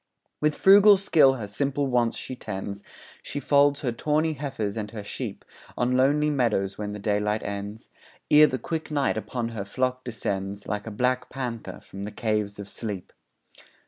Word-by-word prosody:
With 150 0 +2
frugal 200 +1 +7
skill 160 -8 +5
her 115 -5 -5
simple 140 +7 -1
wants 120 -3 +1
she 130 - -6
tends, 100 -3 -6 0.4
She 145 - -5
folds 140 0 +3
her 125 - 0
tawny 155 +6 0
heifers 130 -8 -3
and 105 -2 -4
her 105 -1 -7
sheep 100 - -6 0.3
On 125 +1 +1
lonely 145 +4 +3
meadows 110 -8 +1
when 105 -1 -4
the 105 - -5
daylight 105 +1 0
ends, 100 +2 -6 0.4
Ere 150 +1 +8
the 130 - -2
quick 160 +6 -4
night 145 -3 +1
upon 120 -2 -3
her 110 -4 -4
flock 130 +5 -2
descends 100 -4 -4
Like 105 +1 -3
a - - -2
black 125 +4 0
panther 125 -4 -5
from 95 - -10
the 105 +1 -5
caves 105 -2 -1
of 100 -1 -7
sleep. 100 -3 -6
120 Hz, 175 wpm, -26 LUFS, 105-140 Hz, 0.4 s, Ere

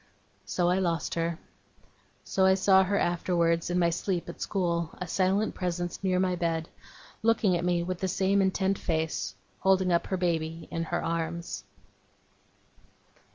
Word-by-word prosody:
So 175 -1 +1
I 180 +1 +2
lost 170 -3 -1
her. 165 0 -1 0.9
So 190 - 0
I 190 - +5
saw 190 0 +5
her 200 +2 0
afterwards, 170 -1 +1
in 175 - 0
my 170 -1 +3
sleep 175 +1 -2
at - - -9
school 170 -4 0
a 180 - -3
silent 190 +5 +1
presence 175 0 -3
near 185 -1 +2
my 185 -1 +1
bed 165 -2 -1 0.5
looking 220 -4 +3
at 175 - -1
me 175 -1 +1
with 180 0 -3
the 190 - -1
same 195 +2 +2
intent 190 0 +1
face 160 -2 -2 0.2
holding 190 -1 +3
up 170 - +1
her 190 - -1
baby 165 -2 -1
in 165 0 -2
her - - -2
arms. 165 - -3
175 Hz, 155 wpm, -28 LUFS, 170-190 Hz, 0.9 s, I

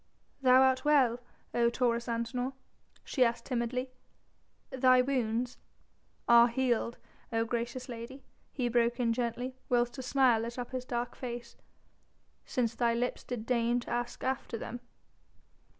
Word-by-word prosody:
"Thou 260 0 +6
art 260 0 +3
well, 265 -6 +4 0.3
O 235 -1 +3
Taurus 235 -1 0
Antinor?" 235 +3 -2 0.5
she 260 - +2
asked 235 -1 0
timidly; 250 +1 -2 0.8
"thy 255 -1 +5
wounds...." 250 -2 0 0.7
"Are 235 0 +8
healed, 240 -1 0 0.3
O 225 0 +1
gracious 240 +2 -3
lady," 245 +2 -8 0.3
he 250 -3 -1
broke 240 +1 +1
in 230 -2 +2
gently, 245 +2 -2 0.2
whilst 245 +1 +1
a - - -2
smile 255 -3 +3
lit 235 +2 -5
up 245 +1 -5
his 255 -1 -4
dark 240 -1 -3
face, 240 -2 -6 0.9
"since 235 -3 0
thy 235 0 +1
lips 245 +1 -2
did 240 -3 -5
deign 240 0 +1
to - - -8
ask 240 0 -3
after 260 -3 -2
them." 245 +2 -6
240 Hz, 140 wpm, -31 LUFS, 235-255 Hz, 0.9 s, Are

